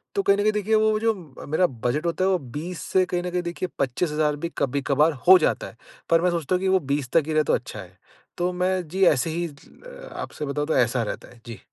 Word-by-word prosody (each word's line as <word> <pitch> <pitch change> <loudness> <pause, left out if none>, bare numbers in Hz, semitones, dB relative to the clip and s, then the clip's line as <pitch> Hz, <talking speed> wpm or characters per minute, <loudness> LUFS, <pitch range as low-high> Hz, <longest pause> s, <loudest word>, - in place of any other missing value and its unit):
तो 400 - +2
कहीं 200 - +4
न - - +1
कहीं 215 +1 +3
देखिए 210 +1 0
वो 215 0 +3
जो 225 0 +2 0.3
अ, - - -8
मेरा 155 +5 +2
बजट 125 +8 -1
होता 170 +2 0
है - - +3
वो 185 - +3 0.2
20 175 +3 -5
से 185 -1 +4
कहीं 180 -1 -2
न 180 - -3
कहीं 180 - 0
देखिए 175 +1 -4
25,000 150 +3 0
भी 165 +3 -4
कभी-कभार 140 +3 +2 0.2
हो 185 0 +10
जाता 155 - 0
है, - - -14 0.3
पर 165 0 +4
मैं 180 - +3
सोचता 170 +1 -1
हूँ 180 - -1
कि 190 - 0
वो 190 0 +4
20 140 -4 -2
तक 165 - +5
ही 155 - -2
रहे 155 0 +3
तो - - 0
अच्छा 120 -4 -3
है। 95 -1 -12 0.4
तो 180 +1 0
मैं 180 -1 -1
जी 190 +4 -1
ऐसे 130 +6 -1
ही 170 +2 -2
अ, - - -13
आपसे 150 - -6
बताऊँ 145 +1 -2
तो 160 - 0
ऐसा 120 0 +2
रहता - - -6
है। 120 - -18
जी। 115 -3 -8
170 Hz, 260 wpm, -24 LUFS, 145-185 Hz, 0.4 s, हो